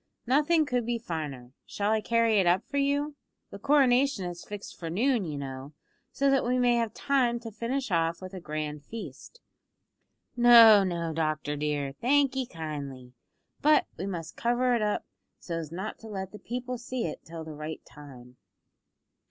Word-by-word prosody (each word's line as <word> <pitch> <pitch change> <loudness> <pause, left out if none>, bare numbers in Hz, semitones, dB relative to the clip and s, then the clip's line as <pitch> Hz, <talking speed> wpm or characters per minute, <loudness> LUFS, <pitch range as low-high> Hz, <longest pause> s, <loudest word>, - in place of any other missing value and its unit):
Nothing 300 +5 +3
could 250 -3 0
be 235 +1 -1
finer. 150 - -6 0.2
Shall 205 +1 -1
I 220 0 +2
carry 230 -1 +3
it 185 - +2
up 180 +4 +2
for 285 - -4
you? 285 +1 0 0.4
The - - -8
coronation 275 -6 +3
is 175 -1 -6
fixed 205 -1 -8
for 165 -3 -5
noon, 230 +4 +1
you 150 -3 -4
know, 135 +1 -7 0.4
so 275 0 +2
that 270 - +3
we 250 +1 +1
may 245 -1 +3
have 230 -2 0
time 260 -4 +1
to 230 -1 -7
finish 240 +3 -3
off 165 -1 +1
with 185 0 -9
a 190 - -6
grand 150 -2 -4
feast." 230 - -9 0.9
"No, 230 -4 +8
no, 170 -3 -2
doctor 155 -2 -1
dear. 145 -2 -2
Thank 275 +1 +3
'ee 260 -2 -1
kindly, 140 - -7 0.5
but 305 +1 +5
we 185 +4 -5
must 170 -4 -5
cover 245 +1 +1
it 235 - +1
up, 210 -1 -1 0.3
so's 165 -3 -5
not 190 +5 -5
to 225 - -11
let 190 -3 -5
the 210 - -10
people 250 +1 -5
see 250 0 -3
it 160 - -6
till 165 0 -8
the 160 -1 -8
right 155 +1 -7
time." 125 -4 -14
205 Hz, 175 wpm, -28 LUFS, 160-245 Hz, 0.9 s, No